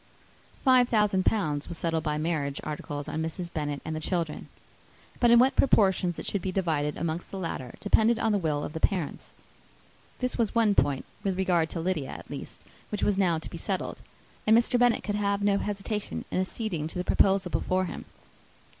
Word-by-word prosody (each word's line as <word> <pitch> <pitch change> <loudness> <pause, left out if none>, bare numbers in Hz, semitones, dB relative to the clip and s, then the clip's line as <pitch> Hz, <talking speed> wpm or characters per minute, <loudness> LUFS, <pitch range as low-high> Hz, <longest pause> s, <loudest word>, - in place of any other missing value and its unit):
Five 255 -2 +6
thousand 210 -4 +2
pounds 150 -9 0
was 170 - -5
settled 165 -2 -1
by 150 -1 -1
marriage 150 -3 -1
articles 145 -1 -5
on 160 - -3
Mrs. 170 +2 -4
Bennet 145 -2 -3
and 160 - -3
the - - -2
children. 165 -1 -3 0.7
But 240 - +4
in 235 - +8
what 260 +3 +5
proportions 190 -8 +3
it - - -6
should 200 - -1
be 190 - -2
divided 155 -6 0
amongst 170 +1 -3
the 195 - -6
latter 165 -9 -5
depended 220 +3 +3
on 225 - +1
the 205 - +2
will 150 -4 -1
of - - -5
the 160 - -4
parents. 175 -3 -1 0.8
This 250 -1 -2
was 230 0 +1
one 225 -3 +4
point, 140 -8 +1 0.2
with 195 -3 -1
regard 175 -4 +2
to 170 - -4
Lydia 165 -5 -1
at - - -9
least, - - -7 0.3
which 210 - -3
was 200 -1 +2
now 175 -4 +3
to 160 - -7
be - - -6
settled, - - -3 0.5
and 220 +1 +7
Mr. 240 +1 +2
Bennet 245 -1 +3
could 205 - -2
have 200 0 0
no 200 -1 +3
hesitation 210 +1 -3
in 185 - +1
acceding 185 -5 -3
to 165 - -7
the 180 - -1
proposal 190 -1 +2
before 185 0 0
him. - - -7
185 Hz, 200 wpm, -28 LUFS, 160-210 Hz, 0.8 s, in